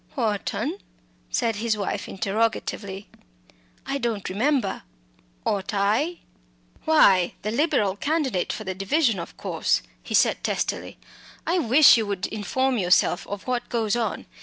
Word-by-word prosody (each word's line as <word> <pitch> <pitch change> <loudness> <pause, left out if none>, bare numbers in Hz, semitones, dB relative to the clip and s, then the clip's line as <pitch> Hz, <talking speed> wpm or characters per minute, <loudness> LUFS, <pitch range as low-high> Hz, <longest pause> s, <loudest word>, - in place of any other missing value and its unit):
"Wharton?" 215 -6 -2 0.5
said 225 - 0
his 220 0 0
wife, 200 - -3
interrogatively. 200 -1 -2 0.8
"I 275 - -2
don't 230 -6 -2
remember 235 +1 0 0.6
ought 200 0 -1
I?" 220 - +1 0.6
"Why, 195 - +5
the 215 - -1
Liberal 235 - +1
candidate 285 - 0
for 215 - -5
the 190 -2 -3
division, 210 - +1
of 170 - -8
course," - - 0 0.2
he - - -3
said - - +3
testily. - - -2 0.5
"I 355 +2 +1
wish 285 0 +7
you 220 -2 -1
would 200 -2 -2
inform 250 +5 -1
yourself 180 0 +2
of 205 -1 -6
what 250 -1 -2
goes 225 -2 0
on. 235 -2 -2
220 Hz, 135 wpm, -24 LUFS, 200-260 Hz, 0.8 s, wish